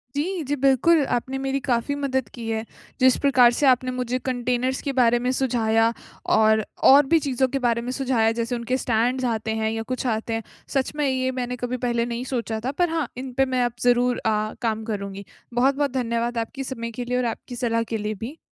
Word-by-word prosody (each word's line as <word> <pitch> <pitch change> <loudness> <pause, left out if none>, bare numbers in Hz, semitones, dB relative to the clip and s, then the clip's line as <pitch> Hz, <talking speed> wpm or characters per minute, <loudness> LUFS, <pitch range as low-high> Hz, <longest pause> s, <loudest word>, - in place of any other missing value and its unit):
जी, 340 +4 -1
जी। 285 +1 -1
बिल्कुल, 275 +4 +4
आपने 260 +2 -2
मेरी 270 0 0
काफ़ी 255 +1 -1
मदद 265 -4 -1
की 235 -2 -7
है। 220 0 -2 0.3
जिस 255 -1 +5
प्रकार 255 -4 +5
से 290 - +3
आपने 255 0 +3
मुझे 250 0 -2
कंटेनर्स 250 0 -1
के 280 - -2
बारे 240 -2 +4
में 250 +1 0
सुझाया। 225 -3 +2 0.4
और 220 0 +4 0.3
और 280 +2 +8
भी 330 - +6
चीज़ों 265 -3 0
के 275 +2 -2
बारे 235 -2 +1
में 245 +2 -4
सुझाया 255 -4 +1
जैसे 235 +2 -2
उनके 240 +2 -1
स्टैंड्स 250 +2 0
आते 225 -2 -1
हैं 220 - +1
या 225 0 -3
कुछ 255 - -4
आते 225 0 -1
हैं। 225 0 -2 0.3
सच 270 0 0
में 295 -1 0
ये 260 0 0
मैंने 250 0 -2
कभी 245 +1 -3
पहले 235 -1 0
नहीं 235 0 -4
सोचा 230 -2 -2
था 260 - 0
पर 350 +4 +1
हाँ, 325 -2 -1
इन 255 0 -6
पे 270 - +4
मैं 255 -1 0
अब 240 - -2
ज़रूर 245 0 +3
अ, 215 -1 0
काम 220 -2 -1
करुँगी। 200 -2 -5 0.3
बहुत-बहुत 275 +3 +2
धन्यवाद 235 -1 -1
आप - - +2
आपके 270 +4 -7
समय 230 -3 -5
के 245 +2 -5
लिए 250 +1 -1
और 250 - 0
आपकी 235 +2 -5
सलाह 230 -1 0
के - - +1
लिए 210 0 -3
भी। 280 +7 -8
245 Hz, 220 wpm, -24 LUFS, 230-265 Hz, 0.4 s, और